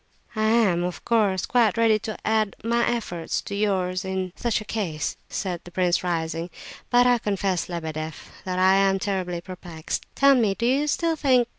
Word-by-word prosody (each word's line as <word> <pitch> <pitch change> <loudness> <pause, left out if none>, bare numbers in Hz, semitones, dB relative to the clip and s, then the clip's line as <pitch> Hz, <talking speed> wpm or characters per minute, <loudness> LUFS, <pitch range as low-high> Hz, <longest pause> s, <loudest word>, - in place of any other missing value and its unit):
"I 215 0 +1
am, 215 -6 +3
of 180 0 -5
course, 205 -5 +2
quite 230 -4 +2
ready 225 -2 +4
to 215 0 -5
add 215 -2 +1
my 235 +1 +2
efforts 175 -8 -2
to - - -7
yours 190 -3 0
in 190 -1 -3
such 235 -2 0
a 215 - -9
case," 180 -9 -2
said 180 -3 -3
the - - -11
prince, 180 0 +1
rising; 165 -1 -2 0.4
"but 245 0 +5
I 245 -1 +4
confess, 195 -4 -1
Lebedeff, 160 -2 -5
that 185 -1 -3
I 190 +1 +5
am 195 0 +3
terribly 185 -3 -2
perplexed. 175 -3 -6
Tell 275 0 +6
me, 220 -7 +2
do 235 - -2
you 275 +5 +2
still 330 +2 +1
think... 255 -5 +3
195 Hz, 180 wpm, -24 LUFS, 180-230 Hz, 0.4 s, Tell